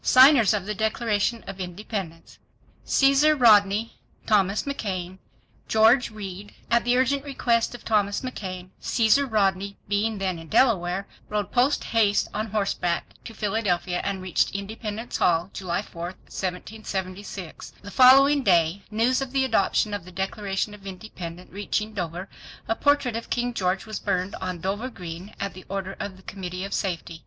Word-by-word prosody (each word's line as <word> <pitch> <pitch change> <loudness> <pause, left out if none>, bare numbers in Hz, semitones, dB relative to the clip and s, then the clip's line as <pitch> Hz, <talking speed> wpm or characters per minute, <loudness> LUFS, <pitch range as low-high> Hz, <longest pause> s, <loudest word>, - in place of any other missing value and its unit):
Signers 260 -4 +7
of 195 -3 -3
the 210 - -2
Declaration 220 +1 0
of 195 0 -8
Independence. 180 -2 -6 0.5
Caeser 275 +2 +4
Rodney—Thomas 210 -2 +3
McKain—George 220 +1 0
Read 205 -2 -8 0.2
At 235 0 +4
the 245 +1 +3
urgent 270 +2 +2
request 240 -5 0
of 245 - -12
Thomas 205 -2 +1
McKain, 185 -8 -6
Caesar 240 +5 +3
Rodney 200 -3 0
being 205 +2 0
then 190 -3 -2
in 165 - -11
Delaware, 190 - +2 0.2
rode 210 -3 -2
post 255 +4 +2
haste 210 -3 +2
on 215 +2 -2
horseback 195 -4 -1
to 225 - -9
Philadelphia 195 -4 0
and 195 -2 -3
reached 185 +1 0
Independence 215 +3 -4
Hall 175 +2 +2
July 185 +1 -2
4, 170 - -11
1776. 185 0 -6
The 200 - -8
following 275 +4 +7
day 175 -3 +3
news 230 +5 +2
of 270 -2 -4
the 270 -1 +2
adoption 215 -2 +1
of 205 -3 -3
the 185 - -12
Declaration 195 +2 -2
of 200 -1 -12
Independence 180 -3 -8
reaching 210 +2 -2
Dover 180 -1 -4 0.4
a 225 - +1
portrait 285 -4 +2
of 230 - -5
King 245 0 -1
George 185 -2 -1
was 215 -1 -5
burned 185 -1 -1
on 185 -2 -4
Dover 205 +7 -2
Green 180 -1 -8
at 200 -1 -3
the 185 - -11
order 195 0 -4
of 195 -2 -5
the 190 - -18
Committee 185 -1 -6
of 195 - -5
Safety. 170 -3 -3
205 Hz, 150 wpm, -25 LUFS, 185-225 Hz, 0.5 s, Signers